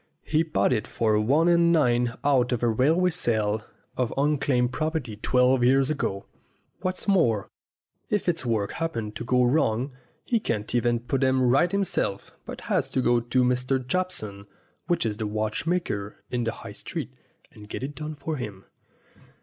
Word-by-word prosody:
He 155 0 +1
bought 160 -5 +1
it 110 - -1
for 110 -2 +1
one 140 +10 +3
and 170 -1 +5
nine 120 -7 +2
out 130 -3 +3
of 125 -1 -1
a - - +4
railway 155 +11 +3
sale 110 -9 0 0.3
of 125 -2 -1
un 145 +1 +2
claimed 125 -3 +1
property 155 -7 -2
twelve 125 +3 +3
years 135 +3 +4
ago. 100 -9 -2 0.5
What's 185 +2 -3
more, 120 - +2 0.6
if 210 -3 0
its 170 -5 0
works 110 -5 -1
happen 115 -11 -3
to 115 - -6
go 125 +1 +2
wrong 125 -1 +1 0.3
he 235 - +1
can't 110 - -3
even 120 -1 +1
put 135 +3 -1
'em 130 0 +3
right 135 +8 +3
himself, 195 - -2
but - - -7
has - - 0
to 130 - 0
go 120 0 +4
to 120 +2 +1
Mr. 125 +1 0
Jobson, 110 - -3 0.4
which 175 -5 +1
is 105 -2 -1
the 110 - -2
watchmaker 110 - -2 0.2
in 120 -2 -1
the 115 - 0
High - - -9
Street, - - -6 0.4
and 105 0 -14
get - - -5
it 140 +2 -4
done 155 +1 -6
for 155 +1 -4
him. 105 -6 -7
125 Hz, 175 wpm, -26 LUFS, 115-155 Hz, 0.6 s, and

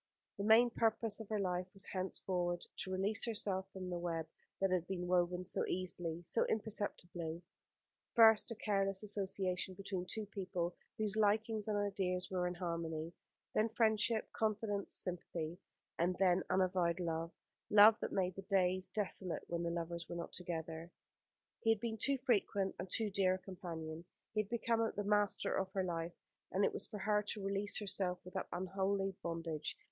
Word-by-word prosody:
The - - -1
main 225 +3 +6
purpose 225 -1 +1
of 220 - -8
her 215 -1 0
life 180 -1 -1
was 195 - -3
henceforward 180 -2 -1
to 190 - -3
release 195 +3 +2
herself 200 -4 -1
from 185 -1 -6
the 175 - -2
web 165 -2 -2 0.3
that 195 -1 +2
had 180 -1 +1
been 180 -2 -3
woven 180 0 +1
so - - 0
easily, 175 -2 -2
so 200 - +2
imperceptibly; 175 -6 -3 0.7
first 225 -2 +8
a 230 - -3
careless 195 -2 +1
association 190 -2 0
between 190 -1 -4
two 220 +2 -2
people 185 -3 -3 0.2
whose 215 -1 0
likings 215 0 +2
and 210 -1 +1
ideas 190 -3 -1
were 180 -1 +1
in 180 - -3
harmony; 170 -2 -3 0.4
then 220 +1 +3
friendship, 220 -1 +2
confidence, 210 -2 -1
sympathy; 175 -2 -3 0.4
and 175 +2 +2
then 185 -1 +4
unavowed 185 -2 +2
love; 165 -1 -1 0.4
love 210 +1 +9
that - - -3
made 185 -2 +1
the 195 - -5
days 185 -2 +2
desolate 190 -3 -2
when 170 0 -1
the 170 - 0
lovers 170 0 -4
were - - -4
not 170 0 -5
together. 165 -1 -4 0.7
He 225 - 0
had 225 -1 +4
been 225 0 -3
too 275 +4 +2
frequent 205 -6 +1
and 180 - -5
too 215 +2 +1
dear 190 -1 +3
a - - -4
companion. 170 -4 -7 0.3
He 215 - +1
had 205 - -9
become 230 -1 +1 0.2
the 205 - -1
master 205 0 +2
of 190 0 -1
her 190 - +1
life, 170 -1 -3 0.4
and 195 +1 +3
it - - +1
was - - -3
for 215 - -6
her 210 +1 +2
to 205 0 -5
release 200 +1 +2
herself 190 -3 -1
from 180 - -10
that 190 - -2
unholy 195 +2 0
bondage. 165 -2 -3
190 Hz, 170 wpm, -37 LUFS, 175-205 Hz, 0.7 s, love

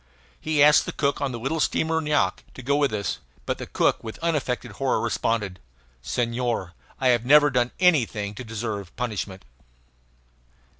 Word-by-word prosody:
He 155 -2 +2
asked 150 0 +6
the - - -2
cook 140 0 -1
on 140 -2 0
the 120 - -4
little 135 +8 -2
steamer 160 +1 +1
Nyoac 150 -1 0
to 130 - -9
go 140 +4 +1
with 145 -1 +2
us; 100 -6 -2 0.3
but - - -2
the - - -6
cook - - +1
with 110 -1 -7
unaffected 130 -7 -1
horror 135 +5 0
responded: 110 -5 -1 0.4
"Senhor, 115 - -2 0.3
I 130 -2 +3
have 120 -2 +3
never 145 +3 +6
done 125 -1 +2
anything 120 - +2
to 115 - -8
deserve 110 -4 -5
punishment!" 100 - -4
125 Hz, 160 wpm, -25 LUFS, 110-145 Hz, 0.4 s, asked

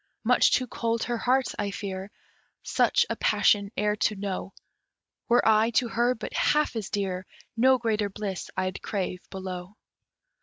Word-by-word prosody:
Much - - +4
too 255 - +2
cold 230 -1 -2
her 240 0 -2
heart, 255 +2 +1
I 205 -1 -1
fear, 195 -1 -5 0.5
Such - - +2
a - - -2
passion 200 -1 +2
e'er 210 +1 +1
to 210 - +1
know 195 -1 -4 0.8
Were 240 -1 +4
I 220 +1 +5
to 240 - +2
her 240 +2 +1
but - - -7
half 300 -4 +2
as 215 -4 -3
dear, 185 -2 -2 0.3
No 260 +3 +5
greater 220 -3 0
bliss 195 -2 -5
I'd 185 0 -2
crave 185 -3 -3
below. 185 0 -7
210 Hz, 155 wpm, -27 LUFS, 195-235 Hz, 0.8 s, I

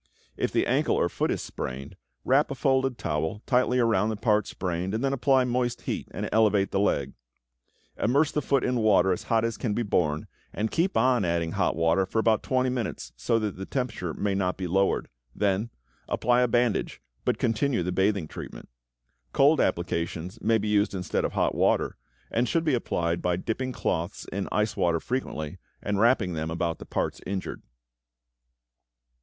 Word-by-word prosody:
If - - -1
the - - +2
ankle - - +2
or - - +2
foot - - -1
is - - -1
sprained, 65 +2 -6 0.3
wrap 135 +4 +3
a 140 - -4
folded 130 -1 +1
towel 80 +6 -2
tightly 125 0 +2
around 110 -4 +2
the 110 - -1
part 105 -1 +1
sprained 90 +2 -3
and 115 - -2
then 135 0 +1
apply 135 0 +3
moist 125 -1 -1
heat - - -3
and - - -4
elevate 105 -3 +3
the 95 - +1
leg. 70 -9 +1 0.9
Immerse 140 +6 +2
the 150 - 0
foot 135 -1 +1
in 125 0 +1
water 95 -4 +4
as - - -4
hot 115 -1 +3
as 115 - -2
can 105 -4 -1
be 120 - 0
borne 80 -7 0 0.3
and 110 +1 -2
keep 185 +3 +1
on 125 -1 +3
adding 85 -2 0
hot - - 0
water 85 +3 +2
for 110 - -4
about 110 -1 +3
20 130 0 +1
minutes, 115 - -3
so 115 - +1
that 105 -4 -2
the 95 - -5
temperature 115 - -2
may 100 +5 -1
not 95 -2 0
be 95 - -3
lowered; 95 +3 +1 0.3
then 100 +2 0 0.4
apply 125 +1 +2
a 125 - +4
bandage, 120 -1 0 0.2
but - - +1
continue 115 -2 +1
the 90 - -2
bathing 95 -2 +1
treatment. - - -9 0.6
Cold 145 +2 +5
applications 85 0 -2
may 115 +1 +3
be 105 0 -3
used 105 -1 +2
instead 90 -1 -1
of - - -2
hot - - +1
water, - - +1 0.4
and 120 +1 +1
should 165 - +1
be 155 - +2
applied 85 -8 -1
by 90 -1 +1
dipping 120 +8 -3
cloths 85 -8 -2
in 100 +1 -3
ice 105 0 0
water 85 -1 +1
frequently, 80 - -4 0.2
and 100 -1 -2
wrapping 110 -5 +3
them 80 0 -3
about 85 0 -2
the - - -9
parts - - -2
injured. 95 -1 -4
105 Hz, 185 wpm, -27 LUFS, 90-125 Hz, 0.9 s, Cold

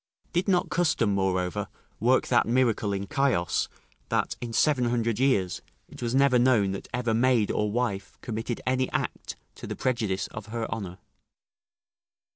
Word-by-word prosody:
Did 175 +3 +1
not 180 -2 +2
custom, 150 - +2
moreover, 95 -2 0 0.3
work 125 +4 +3
that 120 -3 +3
miracle 115 -4 +2
in 100 0 -3
Chios 125 - +1 0.4
that, - - 0
in 120 -1 -4
seven 130 +1 +2
hundred 115 -2 0
years, 115 -9 +1 0.3
it - - -13
was 120 +1 -1
never 135 -2 +5
known 120 -6 +3
that 95 - -6
ever 120 -2 0
maid 120 -2 +3
or 105 0 0
wife 110 -4 -2
committed 115 0 -4
any 130 0 +1
act - - -3 0.2
to - - -9
the - - -4
prejudice 110 -7 -1
of 110 0 -8
her 115 0 -3
honour? 95 -5 -5
115 Hz, 155 wpm, -27 LUFS, 100-130 Hz, 0.4 s, never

